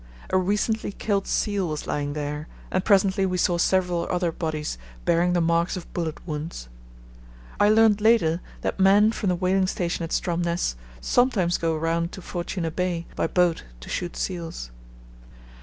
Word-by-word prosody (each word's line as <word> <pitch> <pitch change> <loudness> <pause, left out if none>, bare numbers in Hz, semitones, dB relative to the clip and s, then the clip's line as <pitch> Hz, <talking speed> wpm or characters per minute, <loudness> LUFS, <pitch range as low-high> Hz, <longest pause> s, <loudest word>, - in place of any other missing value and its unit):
A - - +4
recently 210 +3 0
killed 200 -2 -1
seal 200 -3 0
was 155 -1 -4
lying 145 -1 -2
there, 150 +1 -4 0.2
and 185 - +1
presently 195 -1 +3
we 185 -1 0
saw 175 -1 +2
several 180 -2 +1
other 175 -1 0
bodies 155 - -3 0.3
bearing 175 +1 +3
the 175 - +2
marks 170 +2 +1
of 180 - -10
bullet 165 -3 -2
wounds. 150 - -5 0.9
I 205 - +5
learned 215 -1 +5
later 195 -7 +3 0.2
that - - -2
men 200 +3 +6
from 210 -3 -2
the 180 - +2
whaling 185 +1 +1
station 175 -2 -2
at 165 - -4
Stromness 170 - 0 0.3
sometimes 215 -9 +2
go 165 -1 0
round 165 +2 -1
to 190 - -8
Fortuna 175 -1 -3
Bay 175 0 -2
by - - 0
boat 175 -1 +2 0.2
to - - -10
shoot 175 -1 -3
seals. 165 - -4
175 Hz, 160 wpm, -25 LUFS, 165-190 Hz, 0.9 s, men